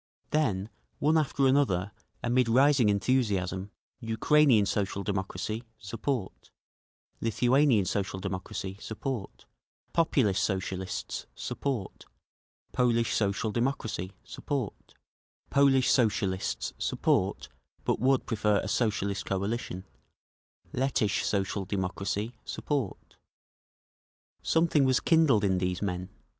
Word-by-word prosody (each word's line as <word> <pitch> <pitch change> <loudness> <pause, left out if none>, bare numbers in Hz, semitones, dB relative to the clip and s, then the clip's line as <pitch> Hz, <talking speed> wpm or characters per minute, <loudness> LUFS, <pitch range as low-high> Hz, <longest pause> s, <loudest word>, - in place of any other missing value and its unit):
Then 110 -10 +1 0.3
one 155 +2 +2
after 140 -3 +2
another, 115 -9 +2 0.3
amid 120 0 +2
rising 130 -1 +5
enthusiasm; 100 -4 0 0.3
Ukrainean 115 +1 +4
Social 100 -1 -1
Democracy, 100 +3 -3
support; 115 +1 -4 0.7
Lithuanian 120 0 +3
Social 95 0 -2
Democracy, 95 0 -5
support; 115 -2 -5 0.5
Populist 120 - +2
Socialists, 95 -1 -3
support; 130 -9 -4 0.7
Polish 115 -2 +2
Social 105 +1 0
Democracy, 110 -6 -2
support; 135 -8 -5 0.6
Polish 135 -2 +4
Socialists 100 -5 0
support—but - - -1
would 130 +1 +2
prefer 105 -2 +1
a - - -5
Socialist 100 -4 0
coalition; 95 -1 -2 0.9
Lettish 125 -6 +1
Social 100 0 -1
Democracy, 100 +3 -2
support…. 135 -9 -4 1.2
Something 160 -3 +3
was 130 -1 +3
kindled 155 -10 +4
in 95 -2 +2
these 90 -1 -1
men. 90 -1 -3
110 Hz, 90 wpm, -29 LUFS, 95-130 Hz, 1.2 s, rising